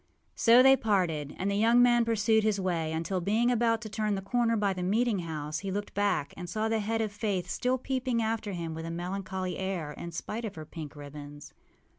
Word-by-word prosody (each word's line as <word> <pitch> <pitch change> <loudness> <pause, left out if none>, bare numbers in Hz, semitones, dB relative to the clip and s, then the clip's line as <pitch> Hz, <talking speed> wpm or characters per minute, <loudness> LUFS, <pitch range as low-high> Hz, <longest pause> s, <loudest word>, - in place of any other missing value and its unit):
â - - -41 0.3
So 240 +2 +6
they 270 0 +8
parted; 175 - 0
and 195 +2 -1
the - - 0
young 230 +3 +4
man 240 -1 +5
pursued 220 -1 +2
his 210 -2 +1
way 170 -4 -1
until, 170 +3 -2
being 225 +7 +2
about 230 -1 +2
to 220 - -6
turn 210 0 -1
the 195 - -4
corner 230 +2 +1
by 200 -2 +1
the 185 - -5
meeting 215 +3 +1
house, 155 -2 -4
he 195 - -5
looked 205 +2 -4
back 200 -8 0
and 175 -1 -7
saw 215 +5 -1
the 225 0 +1
head 225 +2 -1
of 215 -2 -1
Faith 205 -4 -2
still 255 +1 0
peeping 255 -2 -1
after 220 -2 -1
him 165 -2 -4
with 160 +1 -6
a - - -4
melancholy 185 +2 -4
air, 185 -6 -3
in 170 +3 -7
spite 215 +7 -5
of 220 - -5
her 155 -1 -7
pink 155 -1 -8
ribbons. 145 0 -10
200 Hz, 225 wpm, -29 LUFS, 170-225 Hz, 0.3 s, they